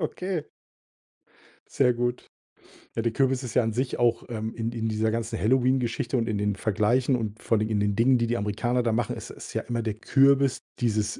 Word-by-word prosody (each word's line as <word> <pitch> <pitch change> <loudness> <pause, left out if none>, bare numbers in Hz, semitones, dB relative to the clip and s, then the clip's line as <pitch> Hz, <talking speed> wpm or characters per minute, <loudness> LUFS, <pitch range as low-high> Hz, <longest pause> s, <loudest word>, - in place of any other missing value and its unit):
Okay. 180 -4 -2 1.3
Sehr 125 -3 +3
gut. 120 +1 -2 0.7
Ja, - - 0
der 115 0 0
Kürbis 135 0 +1
ist 120 -3 -6
ja 125 - +4
an 110 -1 -1
sich 125 +2 -2
auch, 120 -1 +2
ähm, 110 -1 -4
in 115 0 -2
in 115 -1 -3
dieser 110 0 0
ganzen 115 0 -3
Halloween-Geschichte 125 0 +1
und 115 - 0
in 105 - -1
den 105 -1 0
Vergleichen 115 +6 +1
und 110 -2 -4
vor 115 - +1
allem 110 +1 -1
in 105 -2 +1
den 100 0 +1
Dingen, 125 +2 +4
die 115 - 0
die 120 +1 0
Amerikaner 120 +5 0
da 115 - +1
machen, 115 +1 -1
ist - - -8
ist - - -10
ja - - -1
immer 120 0 -2
der 110 -2 -3
Kürbis 135 +2 +3 0.2
dieses 110 -3 0
115 Hz, 210 wpm, -26 LUFS, 110-125 Hz, 1.3 s, ja